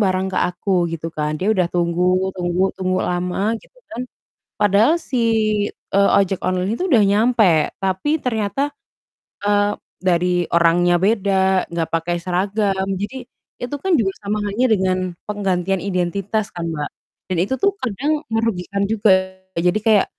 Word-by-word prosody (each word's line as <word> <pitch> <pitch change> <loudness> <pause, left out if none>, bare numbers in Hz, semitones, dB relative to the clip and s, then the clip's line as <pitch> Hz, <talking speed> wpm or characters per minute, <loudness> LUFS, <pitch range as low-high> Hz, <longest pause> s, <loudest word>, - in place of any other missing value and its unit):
barang 190 -2 +1
ke - - +1
aku 180 +2 -1 0.2
gitu 165 0 -4
kan. 150 0 -1
Dia 195 - -1
udah 185 -2 +2
tunggu 180 +2 +1
tunggu 175 +1 0
tunggu 185 0 0
lama 180 +4 -1
gitu - - -24 0.2
kan. 250 - -4 0.6
Padahal 210 - +4
si, 270 -5 -3 0.5
eee, 200 0 +1
ojek 195 -1 -1
online 185 +3 0
itu - - -1
udah 230 -5 +5
nyampe, 205 -6 +3
tapi 195 +12 0
ternyata, 240 +3 -1 0.8
eee, 205 0 +2 0.3
dari 180 -1 +1
orangnya 170 +1 +4
beda, 190 -2 +2
enggak 165 -1 -1
pakai 170 +1 0
seragam. 190 +2 0 0.2
Jadi 250 +4 -5 0.4
itu 245 +4 -3
kan 380 - -1
juga 195 -5 +1
sama 205 +1 -2
halnya 210 +6 +1
dengan 190 -3 +2 0.3
penggantian 195 -3 -1
identitas 200 +3 -2
kan, 170 -1 -4
Mbak, 150 -2 -3 0.4
dan - - -1
itu 200 +8 -1
tuh 400 0 +2
kadang 285 +7 -1
merugikan 200 -3 -1
juga. 190 -3 +2 0.2
Jadi 180 +5 +2
kayak 215 -3 +4
195 Hz, 145 wpm, -20 LUFS, 180-215 Hz, 0.8 s, udah